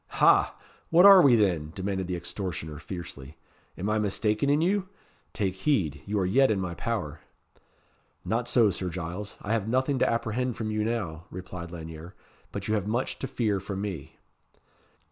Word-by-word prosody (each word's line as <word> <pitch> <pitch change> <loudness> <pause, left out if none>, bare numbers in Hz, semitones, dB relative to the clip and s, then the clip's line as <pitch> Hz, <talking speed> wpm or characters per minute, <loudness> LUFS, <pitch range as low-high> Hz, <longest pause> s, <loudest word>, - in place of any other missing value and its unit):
"Ha! - - +5 0.3
what 175 +3 +6
are 195 -2 +10
we, 135 -7 +6
then?" 85 -8 +1
demanded 95 -1 -2
the 90 - -2
extortioner, 85 -4 -5
fiercely. 75 -4 -8 0.4
"Am 95 - -3
I 110 0 +1
mistaken 105 +5 0
in 145 +1 +4
you? 190 +3 +1 0.4
Take 100 -5 -1
heed. 95 - 0
You 105 +1 -1
are 95 - +1
yet 130 +9 +4
in 105 -3 +1
my 90 -2 -3
power." 80 - -3 1.1
"Not 115 +2 -1
so, 115 -5 +4
Sir 90 0 -3
Giles. 90 +4 -6
I 105 - -1
have 110 -2 0
nothing 130 +3 +1
to - - +3
apprehend 115 +1 -1
from 110 -1 -3
you 110 0 0
now," 95 -8 -3
replied 90 -1 -7
Lanyere; 80 0 -9 0.4
"but 100 -1 -5
you 110 - 0
have 105 -2 0
much 120 +4 -1
to 135 - -3
fear 105 -6 0
from 95 0 -5
me." 80 -7 -6
100 Hz, 175 wpm, -27 LUFS, 90-115 Hz, 1.1 s, are